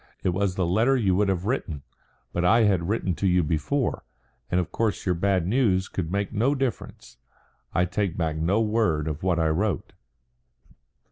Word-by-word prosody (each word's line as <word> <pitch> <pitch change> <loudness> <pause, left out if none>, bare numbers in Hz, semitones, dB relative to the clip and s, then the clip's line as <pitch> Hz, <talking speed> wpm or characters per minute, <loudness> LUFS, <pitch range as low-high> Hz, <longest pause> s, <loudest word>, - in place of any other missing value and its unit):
"It - - +2
was 95 +1 0
the 95 - 0
letter 115 +10 +3
you 95 -6 +2
would 100 0 +2
have 95 -1 -1
written. 85 - -2 0.5
But 85 - -1
I 115 +6 +5
had 95 -5 +2
written 100 -4 0
to 95 - -1
you 90 -1 +3
before, 80 - -1 0.5
and 90 - +1
of 90 - -3
course 110 -3 -1
your 90 - +2
bad 95 0 +1
news 95 -3 +2
could 85 -3 -4
make 100 0 -2
no 125 +7 +2
difference. 125 - -4 0.5
I 90 - +2
take 95 -1 -2
back 80 -3 -1
no 85 +8 +1
word 105 -9 +1
of 75 0 -4
what 90 -2 +1
I 80 -1 +2
wrote." 90 0 -1
95 Hz, 185 wpm, -25 LUFS, 85-105 Hz, 0.5 s, I